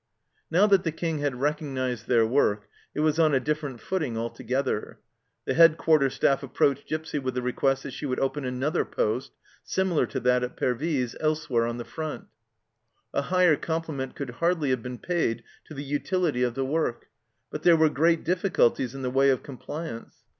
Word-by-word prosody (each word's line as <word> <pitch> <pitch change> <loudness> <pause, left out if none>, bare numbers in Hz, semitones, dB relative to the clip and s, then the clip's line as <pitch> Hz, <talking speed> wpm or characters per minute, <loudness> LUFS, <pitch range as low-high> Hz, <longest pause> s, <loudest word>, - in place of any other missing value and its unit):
Now 180 +5 +4
that 195 -3 +4
the 165 - 0
King 160 -1 -2
had 140 -4 -2
recognized 135 -5 -2
their 115 -2 +4
work 110 -4 +1 0.3
it 150 - 0
was 155 +1 +2
on 155 -3 +4
a - - +4
different 145 -2 -3
footing 155 -10 -2
altogether. 120 +1 -2 0.5
The - - 0
Head 165 -1 +6
quarter 155 -5 +3
Staff 135 +1 +1
approached 140 0 0
Gipsy 155 -1 -3
with 130 -2 -3
a - - +1
request 135 +2 0
that 140 - -6
she 145 - -5
would 130 - -1
open 135 +2 -1
another 130 +4 0
poste, 110 +5 -2 0.3
similar 190 -4 +1
to 130 - -3
that 125 +1 +3
at 125 - -5
Pervyse, 130 -1 -1
elsewhere 155 -7 0
on 120 0 -3
the 120 - -6
front. 160 +4 -5 0.9
A - - +1
higher 180 +1 +3
compli 160 +1 -3
ment 130 -1 -5
could 140 -3 -5
hardly 160 +1 0
have 130 -2 0
been 125 +1 -6
paid 120 -8 -1 0.2
to 155 - -11
the 140 - -5
utility 145 0 -1
of 120 -1 +1
the 135 - -1
work, 140 -4 -1 0.5
but - - -5
there 170 -2 +6
were 160 0 +5
great 160 +3 +2
difficulties 165 - +1
in 135 - -6
the 125 - -1
way 135 +1 +4
of 130 -2 +1
compliance. 140 -1 -7
140 Hz, 190 wpm, -26 LUFS, 125-160 Hz, 0.9 s, Head